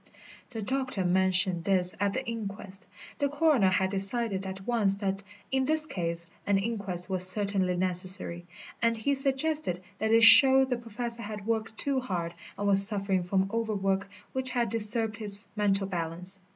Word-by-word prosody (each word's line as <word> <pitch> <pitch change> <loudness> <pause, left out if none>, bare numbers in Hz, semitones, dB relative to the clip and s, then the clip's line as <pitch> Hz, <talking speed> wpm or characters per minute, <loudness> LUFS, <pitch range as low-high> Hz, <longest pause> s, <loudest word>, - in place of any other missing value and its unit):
The 225 -3 -6
doctor 255 -5 -3
mentioned 185 -1 +1
this 185 -1 +4
at 200 0 0
the 260 0 -4
inquest 200 -4 -7 0.3
the 285 -1 0
coroner 290 -9 +2
had 190 0 0
decided 195 0 -1
at 190 0 -8
once 215 -5 +1
that 195 -1 -3 0.3
in 265 0 +1
this 310 +2 +1
case 170 - -4 0.2
an 200 -1 +2
inquest 195 -4 -3
was 185 -1 +6
certainly 190 -2 +1
necessary 180 -1 +1 0.3
and 230 0 +1
he 250 +6 -1
suggested 275 - -1 0.2
that 220 - -1
it 230 0 +4
showed 265 +4 +8
the 250 - 0
Professor 235 0 -6
had 210 -1 -7
worked 225 0 -3
too 275 -2 0
hard 175 -9 -4 0.2
and 205 - -3
was 195 0 +6
suffering 195 -2 -1
from 190 +2 -1
overwork 200 -4 -2 0.2
which 260 0 -3
had 240 -2 -1
disturbed 225 0 0
his 205 -1 -1
mental 200 -2 0
balance. 180 +1 -5
205 Hz, 165 wpm, -28 LUFS, 190-230 Hz, 0.3 s, showed